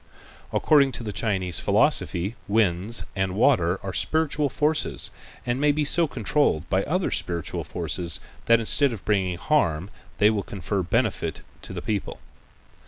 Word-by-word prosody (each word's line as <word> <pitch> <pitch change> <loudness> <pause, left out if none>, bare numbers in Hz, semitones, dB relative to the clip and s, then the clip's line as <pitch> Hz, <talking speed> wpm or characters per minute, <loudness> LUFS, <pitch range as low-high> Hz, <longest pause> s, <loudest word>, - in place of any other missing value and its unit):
According 140 -3 +4
to 115 - -3
the 105 -2 -5
Chinese 95 -6 -1
philosophy 95 +7 +1
winds 105 0 +1
and 95 -1 -1
water 95 -7 +3
are 95 -1 -4
spiritual 155 +1 0
forces 150 +4 0 0.3
and 120 +2 -1
may 150 0 +4
be 150 +1 0
so 165 +3 +4
controlled 120 - 0
by 95 +1 +2
other 180 +4 0
spiritual 85 -2 -3
forces 85 -1 -2 0.3
that 115 0 +6
instead 130 +4 +3
of 105 - -9
bringing 95 -4 0
harm 95 - 0 0.3
they 105 +1 +5
will 105 -2 -1
confer 100 0 -3
benefit 95 -4 -1 0.2
upon - - -9
the - - -5
people. 105 -3 -3
105 Hz, 150 wpm, -25 LUFS, 90-140 Hz, 0.3 s, that